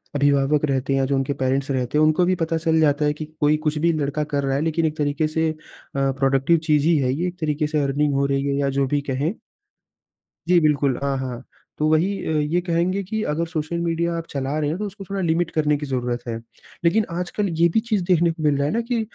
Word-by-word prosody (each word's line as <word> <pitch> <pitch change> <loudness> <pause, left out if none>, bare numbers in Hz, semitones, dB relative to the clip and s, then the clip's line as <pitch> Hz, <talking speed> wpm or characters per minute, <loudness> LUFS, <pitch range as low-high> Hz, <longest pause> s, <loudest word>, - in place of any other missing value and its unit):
अभिभावक 145 +1 +2
रहते 135 -1 0
हैं, 135 0 +2
जो 140 +1 0
उनके 135 +1 0
पेरेंट्स 135 0 -1
रहते 130 +1 -1
हैं, 155 - +4
उनको 155 +3 +3
भी 185 +1 +2
पता 165 -1 -1
चल 160 0 +1
जाता 150 -1 +3
है 150 - +2
कि 155 +1 -6
कोई 150 +1 +3
कुछ 150 0 0
भी 170 +3 +2
लड़का 150 -1 -1
कर 145 -1 -2
रहा 135 0 0
है, 140 - 0
लेकिन 165 +1 0
एक 155 0 -2
तरीके 150 +1 0
से 160 +1 0
अ, - - -9 0.4
प्रोडक्टिव 135 +3 +2
चीज़ 150 -2 +3
ही 170 - +4
है 130 -2 +1
ये। 170 +6 -1
एक 180 +1 -7
तरीके 150 -1 0
से 155 0 0
अर्निंग 140 +1 +1
हो 140 0 +1
रही 140 0 0
है 140 - 0
या 140 -1 +1
जो 135 - +2
भी 145 +2 0
कहें। 145 - -1 1.1
जी, 180 0 +5
बिल्कुल। 145 -5 +2
हाँ, 140 -1 0
हाँ। 130 -2 -5 0.3
तो 155 - +1
वही 160 +4 +3 0.2
अ, - - -1
ये 150 +4 +1
कहेंगे 175 +2 0
कि 220 +4 -3
अगर 160 +3 0
सोशल 160 0 -3
मीडिया 170 0 -1
आप 165 - -5
चला 140 +1 -2
रहे 150 -1 0
हैं, 160 - -2
तो 210 - -2
उसको 200 0 -8
थोड़ा 195 -1 -2
लिमिट 170 0 +1
करने 150 -1 +1
की 145 - -5
ज़रूरत 125 -3 -2
है। 115 - -2 0.5
लेकिन 210 +6 +3
आजकल 180 +4 -2
ये 170 - +7
भी 195 - +2
चीज़ 220 -4 -1
देखने 175 -2 +3
को 160 -1 -7
मिल 150 -2 +3
रहा 140 - +1
है - - -1
ना 230 - +1
कि 235 0 -1
150 Hz, 250 wpm, -22 LUFS, 140-170 Hz, 1.1 s, ये